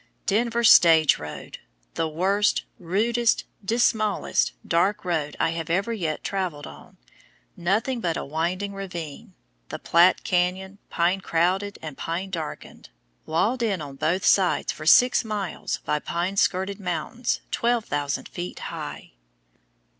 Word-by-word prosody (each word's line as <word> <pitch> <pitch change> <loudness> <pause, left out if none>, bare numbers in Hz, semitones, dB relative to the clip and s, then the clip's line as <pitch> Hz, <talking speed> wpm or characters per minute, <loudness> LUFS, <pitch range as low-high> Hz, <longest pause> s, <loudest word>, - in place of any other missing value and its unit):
"Denver 235 +3 +1
stage 165 -8 +6
road!" 75 0 -8 0.3
The 165 - -1
worst, 195 +6 +1 0.2
rudest, 225 +7 +1 0.2
dismallest, 220 -1 +1
darkest 190 +5 +1
road 155 -4 -2
I 165 - +2
have 165 -1 -5 0.2
yet 165 -8 -3
traveled 185 -7 -3
on, 75 0 -13 0.6
nothing 220 +8 0
but 170 -5 -1
a - - -4
winding 175 +7 -2
ravine, 175 -7 -7 0.3
the - - -5
Platte 175 +2 +4
canyon, 185 +2 -1
pine 180 +3 +1
crowded 185 +4 0
and 155 -3 -6
pine 180 +4 -3
darkened, 160 -4 -7 0.4
walled 215 +11 +1
in 210 -6 0
on 145 -3 -8
both 175 +7 0
sides 190 -3 +3
for 155 - -8
six 250 +10 +6
miles 205 -6 -3
by 150 - 0
pine 175 +5 -3
skirted 195 +1 0
mountains 200 +6 -2
12,000 210 -12 -1
feet 175 +1 -6
high! - - -7
185 Hz, 125 wpm, -24 LUFS, 165-205 Hz, 0.6 s, stage